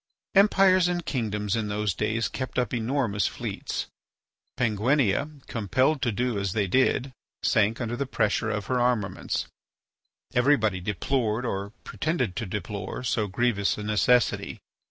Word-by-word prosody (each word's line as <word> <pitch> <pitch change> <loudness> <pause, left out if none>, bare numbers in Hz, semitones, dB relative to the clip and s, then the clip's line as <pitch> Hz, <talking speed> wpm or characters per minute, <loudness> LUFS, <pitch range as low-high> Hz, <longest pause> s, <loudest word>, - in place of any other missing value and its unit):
Empires 195 -2 +5
and 175 -1 -2
kingdoms 105 -5 -1
in 110 -2 -1
those 105 -1 -1
days 110 +5 0
kept 130 -1 -5
up 125 -1 0
enormous 115 -3 0
fleets. - - -4 0.7
Penguinia, 125 +5 +1
compelled 130 +7 +1
to 120 - +1
do 120 0 -1
as 100 -2 -2
they 105 -2 +1
did, 130 +5 +1 0.3
sank 110 +1 +2
under 120 -1 -2
the 140 +2 -2
pressure 110 -2 0
of 105 -2 -2
her 130 -1 0
armaments. 120 -5 0 0.9
Everybody 120 -7 +3
deplored 110 +4 -1
or 100 -3 -3
pretended 130 - -2
to 115 - -3
deplore 100 +4 -5
so 110 -3 0
grievous 100 -1 +1
a 105 - -5
necessity. 110 +3 +2
115 Hz, 135 wpm, -26 LUFS, 105-130 Hz, 0.9 s, Empires